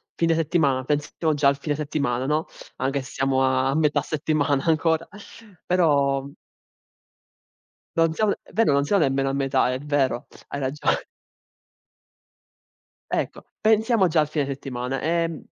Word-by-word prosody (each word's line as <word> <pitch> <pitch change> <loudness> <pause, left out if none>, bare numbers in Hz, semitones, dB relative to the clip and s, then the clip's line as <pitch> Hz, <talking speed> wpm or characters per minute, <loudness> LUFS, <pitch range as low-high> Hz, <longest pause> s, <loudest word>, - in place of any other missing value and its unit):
fine 165 -1 +2
settimana, 150 -5 +1
pensiamo 150 +2 -1
già 145 -1 +2
al 140 0 +3
fine 145 +1 -2
settimana, 140 -4 -2
no, 155 +2 +1 0.3
anche 135 +1 -1
se 130 - -11
siamo 135 0 +1
a 130 +1 +2
metà 150 -2 +2
settimana 145 -2 0
ancora, 160 0 +1 0.6
però 140 -6 +2 1.7
Non 165 -1 +3
sia 215 +4 +1
è - - -19
vero 220 -7 +3
non 140 0 +3
siamo 195 +4 +2
nemmeno 135 0 +1
a 135 - -2
metà, 135 -2 +1
è 130 - -3
vero, 140 -4 0 0.2
hai 140 - -4
ragione. 140 +2 0 2.1
Ecco, - - -2 0.2
pensiamo 220 -2 +3
già 160 0 +2
al 150 - +2
fine 150 -1 -1
settimana. 135 -1 -4
Ehm, 165 +1 -1
145 Hz, 140 wpm, -24 LUFS, 135-160 Hz, 2.1 s, al